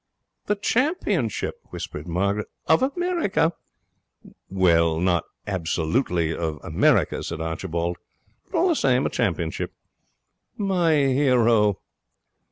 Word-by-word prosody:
'The 210 Hz, -, +2 dB
championship!' 210 Hz, -, 0 dB
whispered 75 Hz, -, -7 dB
Margaret. 100 Hz, +5 st, -1 dB, 0.2 s
'Of 160 Hz, -, +4 dB
America?' 285 Hz, -, +1 dB, 1.0 s
'Well, 85 Hz, -4 st, +3 dB
not 85 Hz, -2 st, +1 dB, 0.2 s
absolutely 85 Hz, -1 st, 0 dB
of 80 Hz, -2 st, -3 dB
America,' -, -, +2 dB
said -, -, -5 dB
Archibald. 85 Hz, +1 st, -3 dB, 0.5 s
'But 365 Hz, -, -1 dB
all 345 Hz, +3 st, +3 dB
the 340 Hz, -, +2 dB
same, 130 Hz, -, +2 dB
a -, -, -1 dB
championship.' 85 Hz, -7 st, -2 dB, 0.8 s
'My 180 Hz, -6 st, +2 dB
hero.' 125 Hz, -7 st, +3 dB
105 Hz, 100 wpm, -24 LUFS, -, 1.0 s, Of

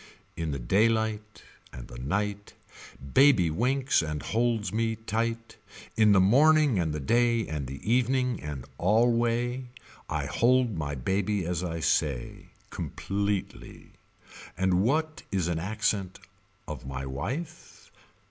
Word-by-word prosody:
In 80 Hz, -1 st, -3 dB
the 70 Hz, -, -2 dB
daylight 110 Hz, -, 0 dB, 0.3 s
And 60 Hz, -2 st, -9 dB
the -, -, -10 dB
night 100 Hz, +9 st, -3 dB, 0.6 s
Baby 130 Hz, -, +5 dB
winks 130 Hz, -, +1 dB
and 75 Hz, -2 st, -4 dB
holds 115 Hz, -2 st, 0 dB
me 115 Hz, 0 st, 0 dB
tight. 115 Hz, +1 st, -3 dB, 0.4 s
In 110 Hz, -1 st, +5 dB
the 100 Hz, -, +6 dB
morning 140 Hz, +4 st, +5 dB
and 80 Hz, -3 st, 0 dB
the 75 Hz, -, -3 dB
day 115 Hz, -, +2 dB
and 75 Hz, -4 st, -4 dB
the 70 Hz, +2 st, -7 dB
evening 125 Hz, +1 st, +1 dB
and 75 Hz, -4 st, -6 dB
alway. 120 Hz, +4 st, +2 dB, 0.4 s
I -, -, -2 dB
hold 125 Hz, -2 st, +2 dB
my 75 Hz, -3 st, -3 dB
baby 95 Hz, -, -1 dB
as 90 Hz, 0 st, -2 dB
I 85 Hz, -2 st, -3 dB
say. 70 Hz, -4 st, -1 dB, 0.2 s
Completely. 100 Hz, 0 st, -4 dB, 0.7 s
And 95 Hz, -1 st, +2 dB
what 155 Hz, +8 st, 0 dB
is 95 Hz, -4 st, 0 dB
an 85 Hz, -2 st, -1 dB
accent 100 Hz, 0 st, -1 dB, 0.5 s
of 75 Hz, -5 st, -6 dB
my 65 Hz, 0 st, -5 dB
wife. 115 Hz, -, -6 dB
105 Hz, 130 wpm, -28 LUFS, 80-120 Hz, 0.7 s, the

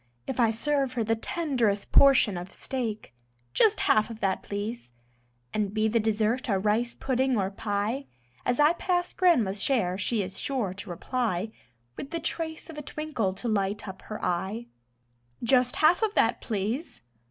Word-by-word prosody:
If 260 Hz, -, -4 dB
I 230 Hz, -2 st, +5 dB
serve 270 Hz, +4 st, 0 dB
her 240 Hz, -3 st, 0 dB
the 225 Hz, +1 st, +1 dB
tenderest 235 Hz, -7 st, -1 dB
portion 265 Hz, -7 st, +6 dB
of 175 Hz, +1 st, -6 dB
steak: 225 Hz, -, -4 dB, 0.4 s
"Just 430 Hz, -1 st, +4 dB
half 215 Hz, +1 st, +3 dB
of 225 Hz, -1 st, -8 dB
that, 195 Hz, -2 st, 0 dB
please." 205 Hz, -, -5 dB, 0.6 s
And 210 Hz, -1 st, -1 dB
be 215 Hz, 0 st, +2 dB
the 230 Hz, +2 st, +2 dB
dessert 220 Hz, +4 st, 0 dB
a 195 Hz, -, +3 dB
rice 215 Hz, +4 st, 0 dB
pudding 260 Hz, -1 st, +1 dB
or 195 Hz, -1 st, 0 dB
pie, 210 Hz, +6 st, -2 dB, 0.4 s
As 245 Hz, +2 st, 0 dB
I 300 Hz, +3 st, +6 dB
pass 355 Hz, 0 st, -1 dB
Grandma's 230 Hz, -, +3 dB
share 200 Hz, -9 st, +1 dB
she 210 Hz, +1 st, +1 dB
is 190 Hz, 0 st, -6 dB
sure 245 Hz, -9 st, -1 dB
to 200 Hz, +1 st, -8 dB
reply, 220 Hz, +1 st, -2 dB, 0.5 s
With 275 Hz, -, -6 dB
the 335 Hz, -, -3 dB
trace 320 Hz, 0 st, -4 dB
of 315 Hz, -2 st, -8 dB
a -, -, -4 dB
twinkle 295 Hz, -9 st, -2 dB
to 235 Hz, -, -5 dB
light 205 Hz, -1 st, -1 dB
up 190 Hz, 0 st, -8 dB
her 215 Hz, -, -7 dB
eye: 190 Hz, +6 st, -2 dB, 0.8 s
"Just 250 Hz, +1 st, +3 dB
half 335 Hz, +5 st, +4 dB
of 435 Hz, -2 st, 0 dB
that, 230 Hz, 0 st, +2 dB
please." 220 Hz, -, -3 dB
225 Hz, 170 wpm, -27 LUFS, 205-270 Hz, 0.8 s, portion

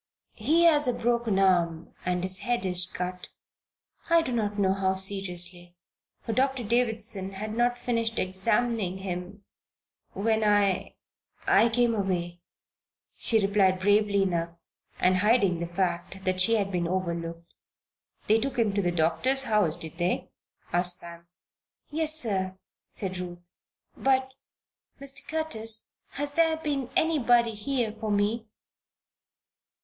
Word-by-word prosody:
"He 310 Hz, +10 st, +3 dB
has 300 Hz, -4 st, +5 dB
a 250 Hz, -, +1 dB
broken 235 Hz, -3 st, 0 dB
arm 175 Hz, -4 st, +1 dB
and 180 Hz, 0 st, -1 dB
his 185 Hz, 0 st, +3 dB
head 240 Hz, -4 st, -1 dB
is 180 Hz, -1 st, +1 dB
cut. 180 Hz, 0 st, -5 dB, 0.8 s
I 335 Hz, 0 st, +5 dB
do 255 Hz, -, -4 dB
not 210 Hz, -3 st, -1 dB
know 190 Hz, -2 st, +2 dB
how 190 Hz, -1 st, 0 dB
seriously, 180 Hz, -2 st, 0 dB, 0.5 s
for 225 Hz, -, -2 dB
Doctor 265 Hz, 0 st, 0 dB
Davison 220 Hz, -4 st, -1 dB
had 210 Hz, +3 st, -5 dB
not 240 Hz, +1 st, +1 dB
finished 230 Hz, -2 st, -2 dB
examining 195 Hz, +1 st, 0 dB
him 190 Hz, +1 st, -6 dB, 0.7 s
when 220 Hz, +2 st, 0 dB
I 205 Hz, -3 st, +1 dB, 0.5 s
I 220 Hz, +4 st, +4 dB
came 240 Hz, 0 st, +2 dB
away," 175 Hz, -4 st, -2 dB, 0.7 s
she 220 Hz, -4 st, +1 dB
replied, 195 Hz, -2 st, +2 dB
bravely 205 Hz, 0 st, +3 dB
enough, 170 Hz, -2 st, -2 dB, 0.4 s
and 185 Hz, 0 st, +3 dB
hiding 205 Hz, -4 st, +3 dB
the 170 Hz, -, -3 dB
fact 175 Hz, +1 st, -3 dB
that 185 Hz, 0 st, +2 dB
she 230 Hz, +5 st, +5 dB
had 200 Hz, -2 st, -1 dB
been 175 Hz, -2 st, -1 dB
overlooked. 170 Hz, -2 st, -4 dB, 0.7 s
"They 220 Hz, +2 st, +4 dB
took 255 Hz, +2 st, -3 dB
him 220 Hz, -4 st, +1 dB
to 200 Hz, -, +1 dB
the 175 Hz, -2 st, 0 dB
doctor's 215 Hz, +12 st, +1 dB
house, 210 Hz, -10 st, +1 dB
did 165 Hz, +1 st, -7 dB
they?" 175 Hz, +1 st, -1 dB, 0.4 s
asked 175 Hz, 0 st, +1 dB
Sam. 170 Hz, -1 st, -12 dB, 0.6 s
"Yes, 310 Hz, 0 st, +3 dB
sir," 190 Hz, -7 st, +1 dB, 0.3 s
said 185 Hz, -2 st, -5 dB
Ruth. 175 Hz, -1 st, -8 dB, 0.5 s
"But 265 Hz, -1 st, +1 dB, 0.3 s
" -, -, -45 dB
"Mr. 275 Hz, 0 st, -1 dB
Curtis, 225 Hz, -9 st, -1 dB, 0.2 s
has 290 Hz, +1 st, -3 dB
there 325 Hz, +1 st, +2 dB
been 285 Hz, -5 st, -3 dB
anybody 245 Hz, -7 st, +3 dB
here 230 Hz, +1 st, -2 dB
for 220 Hz, 0 st, -6 dB
me?" 210 Hz, +3 st, 0 dB
205 Hz, 135 wpm, -27 LUFS, 180-235 Hz, 0.8 s, has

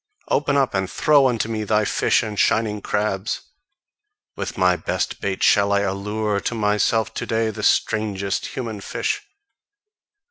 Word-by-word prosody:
Open 145 Hz, 0 st, +1 dB
up, 135 Hz, -2 st, +1 dB
and 95 Hz, -1 st, -1 dB
throw 145 Hz, -3 st, +4 dB
unto 115 Hz, -3 st, 0 dB
me 110 Hz, -1 st, -3 dB
thy 105 Hz, 0 st, +1 dB
fish -, -, +2 dB
and 105 Hz, -3 st, -4 dB
shining 105 Hz, -2 st, +1 dB
crabs! 105 Hz, -1 st, -1 dB, 0.9 s
With -, -, -5 dB
my 90 Hz, -1 st, +4 dB
best -, -, -3 dB
bait 95 Hz, -1 st, -2 dB
shall 100 Hz, 0 st, +4 dB
I 100 Hz, 0 st, +3 dB
allure 100 Hz, +1 st, -1 dB
to 120 Hz, -, -3 dB
myself 110 Hz, +1 st, +1 dB
to -, -, -4 dB
day 115 Hz, -1 st, 0 dB
the -, -, -7 dB
strangest 100 Hz, -2 st, 0 dB
human 115 Hz, -5 st, -5 dB
fish! 415 Hz, -, -2 dB
105 Hz, 150 wpm, -22 LUFS, 100-115 Hz, 0.9 s, throw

